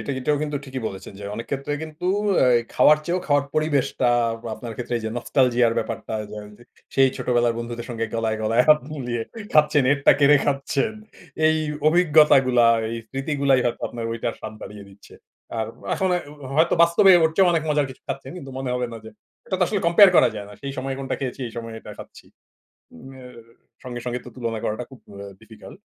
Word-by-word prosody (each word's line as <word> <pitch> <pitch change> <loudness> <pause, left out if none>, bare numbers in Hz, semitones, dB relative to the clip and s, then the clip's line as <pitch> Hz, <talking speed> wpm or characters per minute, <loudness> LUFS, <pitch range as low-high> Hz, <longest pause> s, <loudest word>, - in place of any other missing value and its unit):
এটা - - -5
এটাও 145 +3 0
কিন্তু 150 -1 -2
ঠিকই 130 -1 -5
বলেছেন 95 - -10
যে - - -8
অনেক 115 - -6
ক্ষেত্রে 140 +1 -3
কিন্তু 160 +2 -9 0.4
আ - - +4 0.3
খাওয়ার 150 0 +5
চেয়েও 180 +3 -1
খাওয়ার 145 -2 +2
পরিবেশটা 145 -4 0 0.5
আপনার 115 0 -8
ক্ষেত্রে 125 0 -3
যে - - -1
নস্টালজিয়া 120 -1 +2
ব্যাপারটা - - -5 0.2
ধরেন 105 -1 -8
যে - - -16 0.3
সেই 135 0 +5
ছোটবেলার 120 -2 +1
বন্ধুদের 120 0 -6
সঙ্গে 115 -1 -3
গলায়, 110 -1 -1
গলায় 115 +3 +3
হাত 150 0 +7
মিলিয়ে 120 -5 -3 0.3
খাচ্ছেন, 150 -1 +4
এরটা 140 0 +4
কেড়ে 145 +1 +6
খাচ্ছেন। 140 +7 -1 0.5
এই 160 0 +3 0.3
অভিজ্ঞতাগুলা 150 -7 +4
আর 115 - -2
এই 115 - -4
স্মৃতিগুলাই 135 0 +1
হয়তো 120 - -2
আপনার 115 -1 -6
ঐটার 115 0 -3
স্বাদ 110 0 -7
বাড়িয়ে 105 -1 -9
দিচ্ছে। 100 +1 -17 0.4
আর 110 - -1 0.3
এখন 190 - 0 0.5
হয়তো 160 +2 +3
বাস্তবে 170 +3 +5
ওর 160 - +3
চেয়েও 190 -2 +5
অনেক 165 -2 +1
মজার 150 -1 +1
কিছু 130 - -14
খাচ্ছেন। 135 - -5
কিন্তু 135 -6 -9
মনে 130 -1 -3
হবে 125 0 -1
না - - -6
যে 110 - -10 0.4
এটা 190 - -2
তো - - +2
আসলে 205 0 -1
কম্পেয়ার 185 +3 +7
করা - - +6
যায় 105 -1 -7
না। - - -12
সেই 140 0 -4
সময়ে 135 +1 -3
কোনোটা 135 -1 -3
খেয়েছি 135 0 -4
এই - - -13
সময়ে 115 -1 -6
এটা - - -11
খাচ্ছি। - - -13 0.7
উম 130 +11 -13
আ - - -12 0.6
সঙ্গে, 125 -2 -6
সঙ্গে 125 0 -3
তো - - -9
তুলনা 115 -3 -3
করাটা 110 +3 -2
খুব 130 - -13 0.4
ডিফিকাল্ট। 110 - -14
130 Hz, 190 wpm, -23 LUFS, 115-150 Hz, 0.7 s, হাত